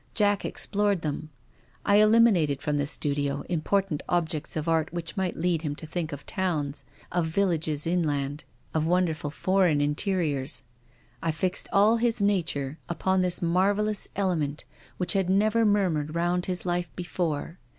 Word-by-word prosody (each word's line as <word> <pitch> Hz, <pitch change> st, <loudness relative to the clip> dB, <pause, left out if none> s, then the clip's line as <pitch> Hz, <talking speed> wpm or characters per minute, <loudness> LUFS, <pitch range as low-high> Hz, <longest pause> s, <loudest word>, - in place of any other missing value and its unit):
Jack 205 Hz, -2 st, +3 dB
explored 205 Hz, -3 st, 0 dB
them. 155 Hz, +1 st, -3 dB, 0.6 s
I 200 Hz, 0 st, +5 dB
eliminated 210 Hz, -, +4 dB
from 145 Hz, 0 st, -1 dB
the 145 Hz, -, 0 dB
studio 145 Hz, -1 st, 0 dB
important 180 Hz, -1 st, 0 dB
objects 160 Hz, -3 st, -1 dB
of 155 Hz, +1 st, -3 dB
art 160 Hz, -1 st, +1 dB
which 170 Hz, -1 st, -5 dB
might 190 Hz, -2 st, -1 dB
lead 170 Hz, -1 st, +1 dB
him 145 Hz, -3 st, -3 dB
to 160 Hz, -, -8 dB
think 160 Hz, 0 st, -3 dB
of 145 Hz, -1 st, -7 dB
towns, 145 Hz, -7 st, -2 dB, 0.3 s
of 175 Hz, -2 st, 0 dB
villages 160 Hz, -4 st, 0 dB
in 175 Hz, +2 st, +1 dB
land, 145 Hz, -2 st, -2 dB, 0.3 s
of 160 Hz, 0 st, 0 dB
wonderful 170 Hz, -4 st, +1 dB
foreign 180 Hz, -1 st, +2 dB
interiors. 150 Hz, -2 st, 0 dB, 0.6 s
I 165 Hz, -, -1 dB
fixed 180 Hz, +4 st, -1 dB
all 210 Hz, +3 st, +5 dB
his 235 Hz, 0 st, +1 dB
nature 165 Hz, -8 st, 0 dB
upon 190 Hz, +2 st, +1 dB
thismarvellouselement 185 Hz, -3 st, 0 dB, 0.3 s
which 180 Hz, -1 st, +1 dB
had 190 Hz, -2 st, +1 dB
never 215 Hz, +4 st, +3 dB
murmured 170 Hz, -7 st, +1 dB
round 175 Hz, +1 st, 0 dB
his 180 Hz, -1 st, -2 dB
life 175 Hz, -1 st, -1 dB
before. 175 Hz, -2 st, -3 dB
175 Hz, 145 wpm, -27 LUFS, 155-190 Hz, 0.6 s, I